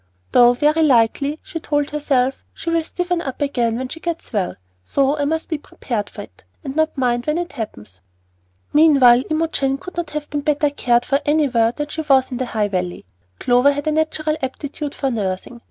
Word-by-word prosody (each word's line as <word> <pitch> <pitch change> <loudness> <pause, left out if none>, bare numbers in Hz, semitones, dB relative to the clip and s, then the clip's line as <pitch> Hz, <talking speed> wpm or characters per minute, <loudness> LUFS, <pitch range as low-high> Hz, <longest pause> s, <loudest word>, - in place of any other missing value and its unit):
"Though 245 0 +6
very 300 +5 +2
likely," 280 +1 +3
she 330 - -6
told 290 -2 -1
herself, 275 -3 0
"she 335 - -4
will 330 -1 +1
stiffen 355 +1 -2
up 265 -5 -5
again 240 -5 0
when 260 +1 -3
she 325 - -8
gets 335 -5 -5
well; 195 -4 -1 0.3
so 275 - +1
I 290 -1 -1
must 320 +2 -1
be 315 - -3
prepared 225 -7 -4
for - - -8
it, - - -18 0.2
and 270 -2 -5
not 315 -1 +1
mind 245 -1 0
when 300 +2 +1
it 350 0 -3
happens." 105 - -8 0.7
Meanwhile 275 -6 +6
Imogen 310 -4 0
could 365 +6 -10
not 340 -3 -2
have 300 -1 -5
been 290 0 -1
better 295 0 +1
cared 240 -4 +1
for 275 0 +1
anywhere 270 -7 +2
than 295 +4 -5
she 315 - -3
was 270 -3 +3
in 250 - -3
the 255 0 -2
High 215 -3 -1
Valley. 180 - -3 0.3
Clover 250 +3 +4
had 285 0 -4
a 310 - +1
natural 310 0 0
aptitude 285 +2 -5
for 270 -2 -1
nursing. 205 +1 -3
280 Hz, 200 wpm, -20 LUFS, 245-305 Hz, 0.7 s, Though